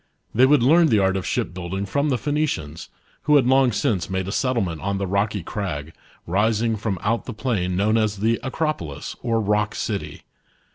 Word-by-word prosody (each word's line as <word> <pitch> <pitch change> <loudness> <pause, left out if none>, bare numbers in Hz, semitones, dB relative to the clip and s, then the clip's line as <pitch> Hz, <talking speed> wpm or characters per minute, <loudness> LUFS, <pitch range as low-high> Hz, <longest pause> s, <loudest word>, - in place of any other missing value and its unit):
They 125 +4 +5
would 145 -3 +4
learn 165 +6 +5
the 110 - +3
art 95 -1 +2
of 95 - -3
shipbuilding 90 +2 -3
from 140 +7 0
the 130 - +1
Phoenicians, 145 - -2 0.4
who 150 - +7
had 135 -4 +5
long 130 0 +4
since 100 -5 -1
made 95 0 -2
a - - -3
settlement 115 - -1
on 100 0 -1
the 100 - -2
rocky 100 0 -1
crag, 80 -7 -4 0.3
rising 110 +5 +1
from 105 -2 -2
out 115 +2 0
the 125 - -6
plain 100 -7 -1
known 105 +3 +2
as 105 -2 0
the 115 +3 +1
Acropolis, 130 - -3
or 115 -2 0
Rock 105 0 0
City. 105 -3 -4
105 Hz, 185 wpm, -23 LUFS, 95-125 Hz, 0.4 s, who